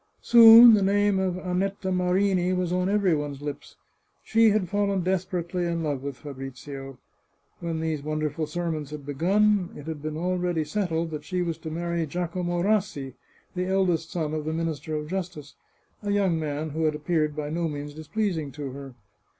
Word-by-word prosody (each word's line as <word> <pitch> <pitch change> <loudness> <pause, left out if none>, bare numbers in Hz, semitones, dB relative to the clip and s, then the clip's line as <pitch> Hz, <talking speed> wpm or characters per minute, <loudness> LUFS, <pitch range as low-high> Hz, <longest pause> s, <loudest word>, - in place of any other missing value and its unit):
Soon 230 0 +10
the 210 - +4
name 200 0 +2
of 185 -1 -1
Annetta 190 +1 -2
Marini 185 0 +1
was 180 -1 -1
on 180 +1 +1
every 200 -3 +2
one's 145 -2 -3
lips. 145 -1 -7 0.5
She 225 0 +4
had 205 -3 +1
fallen 200 0 0
desperately 180 -1 -1
in 170 -1 -2
love 145 -4 -2
with 140 -2 -6
Fabrizio. 135 -1 -8 0.6
When 165 -2 -3
these 160 -2 -2
wonderful 155 +1 -2
sermons 155 -2 -3
had 150 -2 -8
begun, 190 +6 +2
it 145 - -10
had 160 -2 -5
been 155 0 -4
already 180 -1 -1
settled 165 -1 -2
that 150 -1 -5
she 180 -1 -2
was 165 -2 -3
to 160 - -6
marry 170 0 -2
Giacomo 175 +1 -2
Rassi, 190 - 0 0.4
the 180 0 -2
eldest 180 -4 +1
son 155 -3 -3
of 155 -1 -3
the 155 - -2
Minister 160 -1 -3
of 150 0 -4
Justice, 175 -5 -5 0.5
a 205 - -4
young 195 -5 +2
man 155 0 -3
who 160 +2 -1
had 155 -1 +1
appeared 155 -1 0
by 150 -1 -4
no 170 +1 -1
means 145 -1 -6
displeasing 160 -1 -2
to 145 -2 -6
her. 135 -1 -9
170 Hz, 175 wpm, -26 LUFS, 150-185 Hz, 0.6 s, Soon